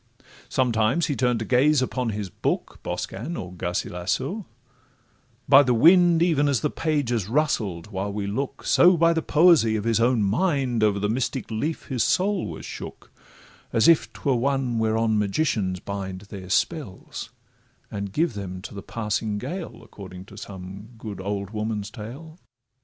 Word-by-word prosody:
Sometimes 120 +4 +2
he 145 - -1
turn'd 125 -2 +1
to 110 - -3
gaze 135 +4 +4
upon 125 -1 -1
his 105 -3 -4
book, - - -2
Boscan, 135 - -4
or 90 0 -6
Garcilasso;—by 90 - -3 1.1
the 125 -3 +2
wind 170 +4 +6
Even 150 -4 +2
as 140 -4 +1
the 150 - 0
page 150 -6 -1
is 110 -6 -1
rustled 110 - 0
while 100 +1 -3
we 100 0 -3
look, 130 +8 -3
So 175 0 +5
by 165 +1 +4
the 165 - 0
poesy 155 -9 +4
of 105 - -2
his 115 0 +1
own 120 -1 +3
mind 125 - +1
Over 105 -2 +3
the 100 +1 0
mystic 125 +2 -2
leaf 145 +9 -2
his 125 -4 +1
soul 190 +1 +1
was - - -7
shook, - - -9 0.6
As 115 - +3
if 165 -2 +4
'twere 140 - -1
one 135 -2 0
whereon 110 0 +1
magicians 100 -4 0
bind 95 -1 -5
Their 100 -2 -10
spells, 140 - -2 0.6
and 100 -1 -4
give 160 - +1
them 95 -3 -6
to - - -8
the 100 - -7
passing 105 0 -2
gale, 175 - -6
According 95 -2 -11
to 100 - -14
some 100 +2 -9
good 105 -4 -7
old 100 0 -3
woman's 105 -1 -3
tale. 135 - -9
115 Hz, 160 wpm, -24 LUFS, 100-145 Hz, 1.1 s, wind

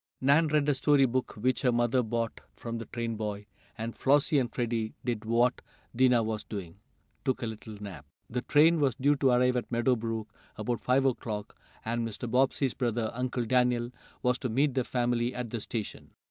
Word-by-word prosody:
Nan 145 +5 +4
read 150 -1 +2
a 145 - +4
story 140 0 +4
book 130 +1 -1
which 125 +4 0
her 125 - +3
mother 120 +1 +2
bought 115 0 -2
from 115 -1 -5
the 115 - -7
train 115 -2 -3
boy, 105 -1 -4 0.3
and 115 +1 -4
Flossie 145 +1 +3
and 125 -2 -1
Freddie 115 -2 -2
did 115 -3 -2
what 120 +3 +2 0.3
Dinah 125 -2 +4
was 110 -1 -3
doing 95 -3 -7 0.4
took 130 -2 -1
a - - 0
little 110 -1 -7
nap. 100 -3 -9 0.2
The 125 +1 -3
train 160 +5 +4
was 135 -5 +2
due 145 +3 +3
to 135 -1 +3
arrive 125 0 +3
at 125 - -4
Meadow 120 +2 +2
Brook 110 -2 -4 0.2
about 115 +2 -2
five 130 +2 +2
o'clock, 110 -5 -2 0.3
and 115 +1 -1
Mr. 115 +2 -4
Bobbsey's 130 +2 +2
brother, 120 -3 -1
Uncle 125 0 -2
Daniel, 125 0 +2 0.3
was 125 0 +2
to 130 - -2
meet 135 +5 +2
the 130 - +1
family 120 0 0
at 125 -3 -4
the 115 - -3
station. 110 -1 -5
120 Hz, 190 wpm, -29 LUFS, 115-130 Hz, 0.4 s, Nan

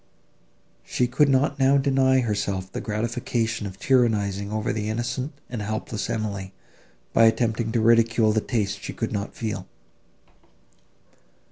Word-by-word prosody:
She 125 - 0
could 140 +4 +3
not 140 +1 +2
now 135 +1 +5
deny 135 -1 +3
herself 100 -4 -2
the - - -4
gratification 115 0 -2
of 95 -1 -9
tyrannising 105 -6 +1
over 110 +3 -1
the 105 -1 -2
innocent 120 +5 -2 0.2
and 120 -3 -5
helpless 110 0 -3
Emily, 100 -4 -3 0.6
by 115 - +6
attempting 115 0 +1
to 115 - +2
ridicule 115 -1 +4
the 110 0 +1
taste 105 -5 -2
she - - -6
could - - -3
not 100 0 -4
feel. 110 -3 -4
115 Hz, 135 wpm, -24 LUFS, 105-125 Hz, 0.6 s, by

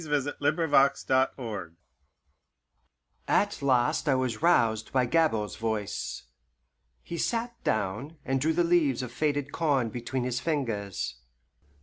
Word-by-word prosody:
XI. 160 - -8
THE 145 -1 0 0.2
COMING 160 -1 -2
OF 135 0 +4
DOLTAIRE 115 -9 -1 1.5
At 205 -5 +1
last 130 +2 +2
I 135 - +4
was 130 -3 -1
roused 115 -10 +3
by 130 -2 +2
Gabord's 115 -8 +1
voice. 110 -2 -3 0.8
He 170 - -6
sat 235 0 -2
down, 110 +10 -2
and 135 0 0
drew 160 +3 +2
the 175 - +2
leaves 155 -7 +2
of 125 - -6
faded 145 +1 -1
corn 140 -8 +1
between 120 +3 -3
his 125 0 -1
fingers. 115 - -2
130 Hz, 130 wpm, -28 LUFS, 115-155 Hz, 1.5 s, OF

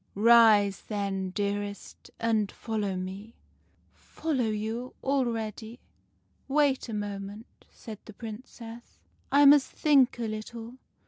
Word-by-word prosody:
" - - -42
' - - -41 0.2
Rise, 205 -4 +5
then, 195 -3 -2
dearest, 205 +1 -4
and 220 -3 +1
follow 210 -4 -3
me.' 190 +5 -7
" - - -36 0.6
4 - - -23
Follow 245 -5 +1
you? 220 +4 -4
Already? 235 -4 -2 0.7
Wait 275 -3 +1
a - - -4
moment,' 205 +1 -7
said 215 -3 -10
the 215 - -11
Prin 220 +1 -7
cess. 235 -1 -12 0.3
4 285 - +5
1 285 - +9
must 290 -2 +5
think 275 -6 +3
a 240 - -3
little. 225 +3 -7
220 Hz, 140 wpm, -28 LUFS, 205-240 Hz, 0.7 s, 1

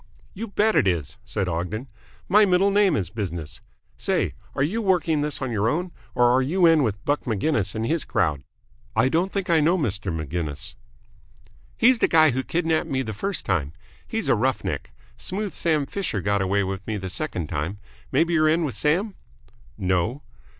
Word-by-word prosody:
"You 225 +4 -5
bet 215 +1 +2
it - - +4
is," 85 -7 -1
said 95 -3 -2
Ogden. 90 +9 -3 0.4
"My 210 +3 +6
middle 195 0 +3
name 200 -4 +4
is 95 -8 -2
business. 85 -8 -5 0.4
Say, - - 0 0.2
are 135 - +1
you 205 +11 0
working 170 -6 +2
this 150 -2 -1
on 130 - -2
your 110 0 +1
own, 175 +6 -1 0.2
or 120 -1 +4
are 130 - +4
you 170 +7 +2
in 165 -2 +6
with 105 -6 -2
Buck 145 0 0
Maginnis 110 -2 0
and 110 +1 -1
his 160 +3 0
crowd?" 75 -7 0 0.5
"I 115 +4 +3
don't 175 +6 +1
think 195 -2 -2
I 165 - +5
know 165 +5 +3
Mr. 100 - -2
Maginnis." 80 -1 -4 1.0
"He's 245 0 +5
the - - +4
guy 155 -3 +5
who 130 +2 -1
kidnapped 160 +2 0
me 130 -1 0
the 110 -3 -5
first 195 - -3
time. 80 -6 0 0.3
He's - - -2
a - - +5
rough - - 0
neck. - - -3 0.3
Smooth 200 0 -4
Sam 155 -4 +1
Fisher 185 - -3
got 100 +1 0
away 100 +1 +1
with 95 +1 -5
me 110 -1 -1
the 95 -1 -5
second 90 - -3
time. 85 +6 -3 0.3
Maybe 165 +5 +2
you're 155 -1 +4
in 165 +2 +2
with 145 -5 -2
Sam?" 180 +8 +1 0.6
"No." 95 +7 0
135 Hz, 190 wpm, -24 LUFS, -, 1.0 s, My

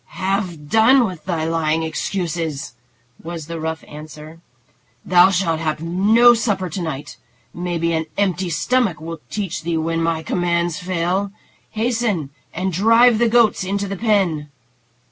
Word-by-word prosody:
"Have 185 -5 -2
done 235 - +5
with 180 -6 -7
thy 170 -4 -1
lying 160 -1 0
excuses," 160 -3 -3 0.5
was 165 -1 -6
the 165 +1 -6
rough 160 0 -4
answer. 155 +2 -11 0.6
"Thou 180 +1 +6
shalt 175 -4 0
have 155 -1 -2
no 210 +8 +5
supper 205 -6 -1
to 185 - -4
night. 150 -4 -5 0.4
Maybe 170 -1 -2
an 160 0 -1
empty 190 -2 0
stomach 205 +1 0
will 165 +1 -7
teach 195 -7 -3
thee 165 0 -2
when 165 +1 -1
my 165 -1 -1
commands 170 -1 -1
fail. 185 +2 -1 0.4
Hasten 220 - -1 0.2
and 185 +2 -3
drive 230 +5 +5
the 235 -1 +3
goats 230 -4 +3
into 200 +2 -2
the 195 - -4
pen." 185 -8 0
175 Hz, 145 wpm, -20 LUFS, 160-200 Hz, 0.6 s, Thou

